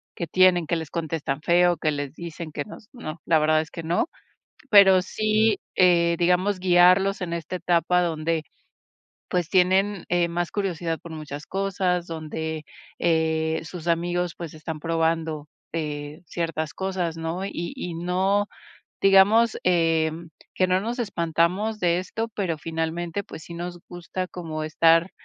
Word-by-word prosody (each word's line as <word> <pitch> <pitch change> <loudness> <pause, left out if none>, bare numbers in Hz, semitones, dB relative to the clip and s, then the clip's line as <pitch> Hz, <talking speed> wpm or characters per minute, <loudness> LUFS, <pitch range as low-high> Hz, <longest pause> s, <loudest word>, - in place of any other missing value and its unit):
que 170 - -4
tienen 180 -2 +4
que 170 - +1
les 160 -3 -6
contestan 155 -4 -3
feo, 175 0 +3
que 155 0 0
les 145 -1 -4
dicen 170 -1 -7
que - - -3
nos 210 0 -12
no, 165 -10 -7
la 160 -2 +4
verdad 155 +1 +3
es 160 - -9
que 165 - -7
no. 170 - 0 0.6
Pero 195 -3 +8
sí, 215 +1 +1 0.2
eh, 170 -2 +4
digamos, 180 +3 +2
guiarlos 185 +2 +4
en 170 - -4
esta 170 +2 -4
etapa 180 0 +2
donde, 160 -1 -1 0.8
pues, 175 -3 -1
tienen, 190 +1 +2
eh, 175 -1 +2
más 175 0 -2
curiosidad 175 -5 -2
por 170 - -10
muchas 150 -2 -7
cosas, 190 -2 -1
donde, 160 -1 -5 0.3
eh, 160 -1 +1
sus 165 +2 -8
amigos, 175 +1 0
pues 170 -3 -7
están 155 0 -6
probando, 165 -2 -1 0.3
eh, 150 0 -4
ciertas 165 -2 -3
cosas, 185 -4 -2
¿no? 165 +4 -3
Y 175 +2 -5
y 180 -10 -5
no, 190 +4 +1 0.5
digamos, 205 +4 +5
em, 165 -2 +1 0.3
que 185 - +2
no 185 +1 +3
nos 235 +4 -4
espantamos 190 +1 0
de 175 -1 +2
esto, 225 +5 -4
pero 190 -8 -3
finalmente, 165 +4 -3
pues, 160 - -10
sí 170 - -9
nos 175 +1 -5
gusta 175 +1 -5
como 160 -4 -5
estar, 165 +3 +4
170 Hz, 150 wpm, -24 LUFS, 160-185 Hz, 0.8 s, Pero